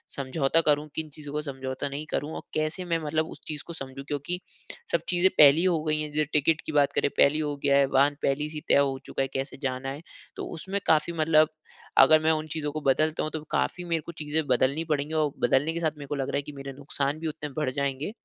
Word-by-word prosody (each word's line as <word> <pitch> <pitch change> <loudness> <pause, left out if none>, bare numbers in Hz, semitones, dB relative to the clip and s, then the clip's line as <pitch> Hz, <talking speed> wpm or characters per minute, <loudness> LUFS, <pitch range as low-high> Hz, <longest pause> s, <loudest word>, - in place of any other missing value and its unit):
समझौता 140 +3 +1
करूँ? 150 -1 +2
किन 160 -1 -3
चीज़ों 145 0 -9
का 150 - -1
समझौता 135 -1 -4
नहीं 145 +3 -5
करूँ? 150 +3 -2
और - - -5
कैसे 155 +4 -1
मैं 165 -1 0
मतलब 155 +1 0
उस - - -11
चीज़ 150 -2 -5
को 170 - -6
समझू? 135 -1 -7
क्योंकि 150 +5 -3 0.5
सब - - +2
चीज़े 180 +1 +3
पहले 145 0 +8
ही 180 - +1
हो 165 -4 +2
गयी 155 -1 +1
हैं। 150 - -4
जो 155 +1 +2
टिकट 155 +2 +3
की - - -4
बात 145 -2 +3
करें, - - +1
पहले 140 - +6
ही - - 0
हो 145 -1 -2
गया 140 -1 +4
है। 140 - +5
वाहन 140 +2 +4
पहले 150 +2 0
से 150 -1 -5
तय - - +6
हो 140 -1 +2
चूका - - -3
है 135 - +1
कैसे 135 +1 -3
जाना 130 0 -2
है। 140 +3 -6 0.3
तो - - -5
उसमें 190 +5 -3
काफ़ी 160 +2 +3
मतलब 155 -1 +4 0.5
अगर 155 +4 +8
मैं 160 - +4
उन 155 0 -1
चीज़ों 150 -1 -3
को 155 0 -4
बदलता 155 +4 +2
हूँ 155 - -3
तो 160 - -4
काफ़ी 180 - 0
मेरे 165 -2 0
को - - -6
चीज़े 155 -1 -2
बदलनी 135 +5 +2
पड़ेगी। 150 +1 -1
और 155 -2 +1
बदलने 135 +6 +2
के 170 - -2
साथ 160 -2 +1
मेरे 145 -1 -8
को 145 - -2
लग 135 -1 -2
रहा - - -2
है - - 0
की 150 +1 -9
मेरे 135 -1 -7
नुकसान 140 +1 -2
भी 160 - -3
उतने 155 -1 -5
बढ़ 150 -4 +1
जाएँगे। 140 +4 -2
150 Hz, 255 wpm, -27 LUFS, 140-155 Hz, 0.5 s, पहले